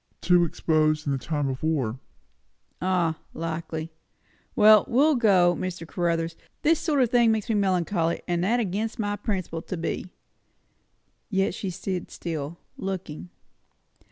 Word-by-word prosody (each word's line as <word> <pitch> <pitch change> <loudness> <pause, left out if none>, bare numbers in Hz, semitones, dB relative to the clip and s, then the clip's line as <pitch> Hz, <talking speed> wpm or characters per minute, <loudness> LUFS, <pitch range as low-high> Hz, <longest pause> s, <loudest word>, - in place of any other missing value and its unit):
"Too 175 -1 +4
exposed, 155 -1 +1
in 145 - 0
the 135 - -1
time 145 0 -2
of 130 -1 -3
the - - -4
war." 130 -7 -1 0.8
"Ah! 175 -4 +1 0.2
likely. 160 0 -4 0.6
Well, 215 0 +7
we'll 290 +6 +4
go, 190 -8 +4
Mr. 180 -2 -5
Caruthers; 165 -1 -1 0.3
this 325 +1 +4
sort 300 -4 0
o' - - +6
thing 235 -1 +4
makes 220 -2 -1
me - - +2
melancholy, 180 -4 +1
and 175 -1 0
that' 230 +6 +2
against 215 +1 -2
my 205 -2 -1
principles 185 -6 -3
to 185 - -3
be." 170 +2 -3 1.2
Yet 195 -3 +1
she 195 - -4
stood 185 0 -4
still, 160 -1 -5 0.2
looking. 185 -3 -5
175 Hz, 145 wpm, -26 LUFS, 165-205 Hz, 1.2 s, Well